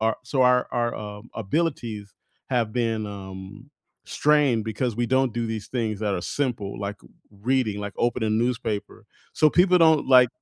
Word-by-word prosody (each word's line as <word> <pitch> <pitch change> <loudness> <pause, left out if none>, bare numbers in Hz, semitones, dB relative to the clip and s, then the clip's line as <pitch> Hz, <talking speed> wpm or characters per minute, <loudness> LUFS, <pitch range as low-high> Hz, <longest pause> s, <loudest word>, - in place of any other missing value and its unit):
our 110 0 +1
so, 130 +1 +1
our 125 0 +4
our, 120 -1 0
um, 105 +2 -8
abilities 115 - -2 0.4
have 120 -4 0
been, 115 -3 -1
um, 100 +5 -9 0.4
strained 145 -7 +2
because 110 +1 -2
we 120 0 0
don't 130 -1 +2
do 120 -1 -1
these 110 -2 -5
things 110 -5 -2
that 105 -2 0
are 90 - -3
simple, 115 -8 -3
like 100 0 -4 0.5
reading, 125 -5 +1
like 100 -1 -5
opening 120 -1 0
a - - -1
newspaper. 115 -2 -2 0.3
So, 155 - +5
people 180 +2 +4
don't, 160 -3 +4
like, 125 -2 +7
115 Hz, 165 wpm, -24 LUFS, 105-130 Hz, 0.5 s, like